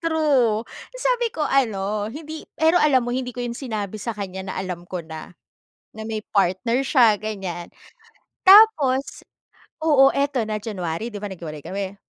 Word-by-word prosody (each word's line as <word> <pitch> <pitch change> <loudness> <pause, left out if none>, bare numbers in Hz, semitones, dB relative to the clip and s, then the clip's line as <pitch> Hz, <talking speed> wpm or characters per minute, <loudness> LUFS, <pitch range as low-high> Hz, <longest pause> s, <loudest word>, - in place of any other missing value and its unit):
True. 280 -9 +2 0.3
Sabi - - +1
ko 315 -7 -3
ano 210 -6 0
hindi 310 +5 -9
pero 320 +3 +4
alam 265 -5 +3
mo 245 - -3
hindi 250 -1 -4
ko 245 - -3
'yon 240 - -3
sinabi 215 -5 -5
sa 230 -1 -4
kanya 190 -1 -6
na - - -4
alam 180 -2 -5
ko 180 -3 -5
na, 160 +2 -10 0.6
na 220 - -6
may 215 -1 -4
partner 200 +6 +1
siya, 240 -6 +4
ganyan. 190 -5 -5 0.8
Tapos 375 -11 +5 0.6
Oo 275 -3 +5
ito 280 -2 0
na 215 0 -2
January, 195 -2 -4
'di - - -6
ba, 205 - -3
naghiwalay 165 -5 -8
kami? 195 0 -4
225 Hz, 160 wpm, -22 LUFS, 195-280 Hz, 0.8 s, Tapos